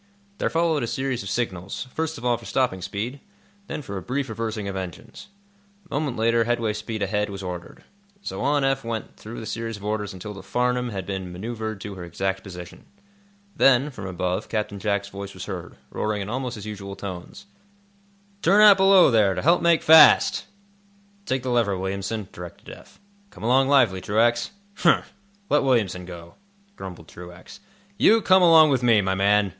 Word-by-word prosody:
There -, -, 0 dB
followed 165 Hz, -2 st, +1 dB
a 120 Hz, -, -2 dB
series 130 Hz, 0 st, -2 dB
of 100 Hz, -, -6 dB
signals, 100 Hz, 0 st, -3 dB
first 160 Hz, -1 st, -3 dB
of 125 Hz, -, -9 dB
all 120 Hz, -1 st, +3 dB
for -, -, -11 dB
stopping 125 Hz, -8 st, 0 dB
speed, 105 Hz, +9 st, -4 dB, 0.5 s
then 150 Hz, -, -5 dB
for 100 Hz, -5 st, -6 dB
a -, -, -5 dB
brief 135 Hz, +3 st, -3 dB
reversing 110 Hz, -2 st, -4 dB
of 100 Hz, -, -4 dB
engines. 95 Hz, -, -8 dB, 0.6 s
A 155 Hz, -, -11 dB
moment 145 Hz, -3 st, -2 dB
later 115 Hz, +1 st, +2 dB
headway 115 Hz, -2 st, 0 dB
speed 110 Hz, 0 st, -4 dB
ahead 105 Hz, +1 st, -1 dB
was 100 Hz, -1 st, -7 dB
ordered. 90 Hz, -1 st, -7 dB, 0.4 s
So 95 Hz, -, -5 dB
on 145 Hz, +1 st, +1 dB
Eph 135 Hz, 0 st, +1 dB
went 115 Hz, -1 st, -5 dB
through 115 Hz, +2 st, -9 dB
the 110 Hz, -, -7 dB
series 115 Hz, -1 st, -4 dB
of 100 Hz, -, -11 dB
orders 105 Hz, -1 st, -2 dB
until 100 Hz, +2 st, -8 dB
the 100 Hz, -, -10 dB
"Farnum" 125 Hz, +4 st, -1 dB
had 95 Hz, -4 st, -5 dB
been 95 Hz, -2 st, -5 dB
manœuvred 110 Hz, +2 st, -5 dB
to 105 Hz, -, -6 dB
her 90 Hz, -2 st, -8 dB
exact 95 Hz, +3 st, -3 dB
position. 90 Hz, -3 st, -10 dB, 0.7 s
Then, 135 Hz, +2 st, +4 dB
from 105 Hz, -7 st, -8 dB
above, 90 Hz, 0 st, -3 dB
Captain 105 Hz, -2 st, -3 dB
Jack's 100 Hz, -1 st, -1 dB
voice 100 Hz, 0 st, -8 dB
was 90 Hz, 0 st, -7 dB
heard, 90 Hz, -4 st, -7 dB, 0.2 s
roaring 105 Hz, -1 st, -2 dB
in 100 Hz, -, -7 dB
almost 125 Hz, +1 st, -3 dB
his 105 Hz, -1 st, -9 dB
usual 100 Hz, -2 st, -7 dB
tones: 95 Hz, -, -8 dB, 1.0 s
"Turn 195 Hz, +5 st, +4 dB
out 205 Hz, -2 st, +9 dB
below, 190 Hz, -5 st, +6 dB
there, 105 Hz, -4 st, +3 dB
to 90 Hz, -, -2 dB
help 170 Hz, +5 st, +4 dB
make 170 Hz, -1 st, +3 dB
fast!" 160 Hz, -1 st, +7 dB, 0.8 s
"Take 130 Hz, -1 st, -1 dB
the 130 Hz, -, -2 dB
lever, 115 Hz, -5 st, +1 dB
Williamson," 95 Hz, +2 st, -4 dB
directed 90 Hz, -1 st, -10 dB
Eph. -, -, -18 dB, 0.3 s
"Come -, -, -13 dB
along 130 Hz, +3 st, +3 dB
lively, 120 Hz, -10 st, +3 dB
Truax." 120 Hz, +4 st, +1 dB, 0.3 s
"Humph! 170 Hz, -, +2 dB, 0.3 s
Let 150 Hz, -, +3 dB
Williamson 105 Hz, -9 st, 0 dB
go," 85 Hz, -1 st, -10 dB, 0.4 s
grumbled 90 Hz, -, -9 dB
Truax. 90 Hz, +1 st, -12 dB, 0.4 s
"You 225 Hz, -1 st, +5 dB
come 185 Hz, 0 st, +5 dB
along 160 Hz, -3 st, +7 dB
with 130 Hz, -2 st, +1 dB
me, 115 Hz, -3 st, +4 dB
my 95 Hz, -1 st, 0 dB
man!" 100 Hz, +1 st, +3 dB
110 Hz, 185 wpm, -24 LUFS, 95-130 Hz, 1.0 s, out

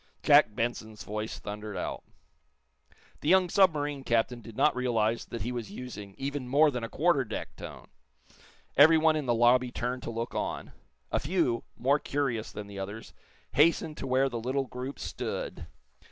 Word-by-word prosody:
Jack 145 Hz, -8 st, +6 dB
Benson's 110 Hz, -2 st, -3 dB
voice 105 Hz, +1 st, -4 dB
thundered 105 Hz, 0 st, -6 dB
out. -, -, -4 dB, 1.2 s
The 150 Hz, -, -1 dB
young 185 Hz, 0 st, +5 dB
submarine 150 Hz, -7 st, +2 dB
captain 120 Hz, 0 st, +1 dB
did 115 Hz, -1 st, -12 dB
not 150 Hz, -, +4 dB
realize 115 Hz, -3 st, 0 dB
that 115 Hz, -, -5 dB
he 120 Hz, -, -3 dB
was 120 Hz, -4 st, -4 dB
using 105 Hz, -3 st, -8 dB
even 140 Hz, -1 st, -3 dB
more 145 Hz, +4 st, +5 dB
than 125 Hz, -3 st, -4 dB
a 115 Hz, -, -4 dB
quarter 155 Hz, -3 st, +2 dB
deck 110 Hz, -3 st, -6 dB
tone. -, -, -9 dB, 0.9 s
Everyone 160 Hz, +2 st, +6 dB
in 150 Hz, -4 st, -2 dB
the 120 Hz, -, +3 dB
lobby 125 Hz, +2 st, +4 dB
turned 125 Hz, +1 st, -3 dB
to -, -, -5 dB
look 115 Hz, +1 st, -4 dB
on. -, -, -3 dB, 0.4 s
A -, -, +2 dB
few, 145 Hz, -8 st, 0 dB
more 140 Hz, +4 st, +2 dB
curious 135 Hz, -8 st, -2 dB
than 105 Hz, -, -7 dB
the 100 Hz, -1 st, -8 dB
others, 100 Hz, +3 st, -7 dB, 0.4 s
hastened 155 Hz, 0 st, +3 dB
to -, -, -5 dB
where 130 Hz, +1 st, +3 dB
the 120 Hz, -3 st, -4 dB
little 130 Hz, +4 st, -1 dB
group 130 Hz, +2 st, -6 dB
stood. -, -, -5 dB
125 Hz, 170 wpm, -29 LUFS, 115-145 Hz, 1.2 s, Jack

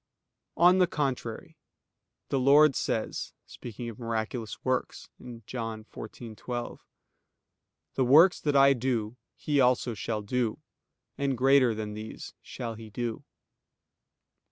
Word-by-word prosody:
On 180 Hz, +3 st, +6 dB
the 180 Hz, -, +5 dB
contrary, 130 Hz, -8 st, -4 dB, 0.7 s
The 135 Hz, -, +1 dB
Lord 140 Hz, +2 st, +6 dB
says, 110 Hz, -, -2 dB
speaking 120 Hz, 0 st, -8 dB
of 115 Hz, 0 st, -8 dB
miraculous 115 Hz, -1 st, -4 dB
works 130 Hz, -1 st, -2 dB, 0.4 s
(John 115 Hz, -2 st, -5 dB
14:12): 115 Hz, +2 st, -7 dB, 1.1 s
"The 130 Hz, -, +1 dB
works 160 Hz, +9 st, +6 dB
that 145 Hz, -2 st, -1 dB
I 140 Hz, 0 st, +7 dB
do, 120 Hz, -3 st, -2 dB, 0.2 s
he 145 Hz, -2 st, 0 dB
also 125 Hz, -1 st, +2 dB
shall 110 Hz, 0 st, -4 dB
do, 115 Hz, +1 st, -1 dB, 0.6 s
and 140 Hz, -2 st, 0 dB
greater 130 Hz, -2 st, +4 dB
than 105 Hz, -1 st, -5 dB
these 110 Hz, +1 st, -8 dB
shall 115 Hz, -2 st, -6 dB
he 110 Hz, 0 st, -11 dB
do." 115 Hz, +1 st, -4 dB
120 Hz, 115 wpm, -28 LUFS, 110-135 Hz, 1.1 s, I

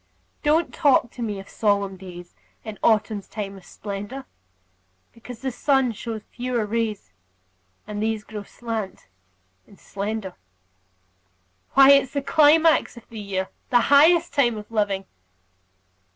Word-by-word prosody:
Don't 315 Hz, +3 st, +2 dB
talk 275 Hz, -6 st, +3 dB
to 245 Hz, -, -10 dB
me 210 Hz, -4 st, -3 dB
of 195 Hz, -, -11 dB
solemn 200 Hz, -2 st, 0 dB
days 180 Hz, -2 st, -11 dB, 0.3 s
In 215 Hz, -2 st, -8 dB
autumn's 215 Hz, -2 st, +1 dB
time 200 Hz, -2 st, -6 dB
of 190 Hz, -, -13 dB
splendor, 205 Hz, +9 st, -7 dB, 0.9 s
Because 235 Hz, 0 st, -11 dB
the 265 Hz, -, -1 dB
sun 265 Hz, 0 st, +2 dB
shows 220 Hz, 0 st, -6 dB
fewer 245 Hz, -2 st, -2 dB
rays, 215 Hz, -, -3 dB, 0.7 s
And 210 Hz, 0 st, -5 dB
these 220 Hz, -1 st, -1 dB
grow 210 Hz, 0 st, -7 dB
slant 220 Hz, -1 st, -6 dB, 0.6 s
and 200 Hz, -, -19 dB
slender. 200 Hz, -1 st, -5 dB, 1.4 s
Why, 275 Hz, 0 st, +8 dB
it's 275 Hz, -1 st, +4 dB
the 280 Hz, -1 st, -1 dB
climax 315 Hz, -1 st, +4 dB
of 235 Hz, -, -13 dB
the 225 Hz, -, -8 dB
year, 190 Hz, -2 st, -3 dB, 0.2 s
The 245 Hz, -, +5 dB
highest 335 Hz, +4 st, +5 dB
time 240 Hz, -5 st, +2 dB
of 210 Hz, +1 st, -10 dB
living! 205 Hz, -3 st, 0 dB
220 Hz, 135 wpm, -23 LUFS, 200-265 Hz, 1.4 s, Why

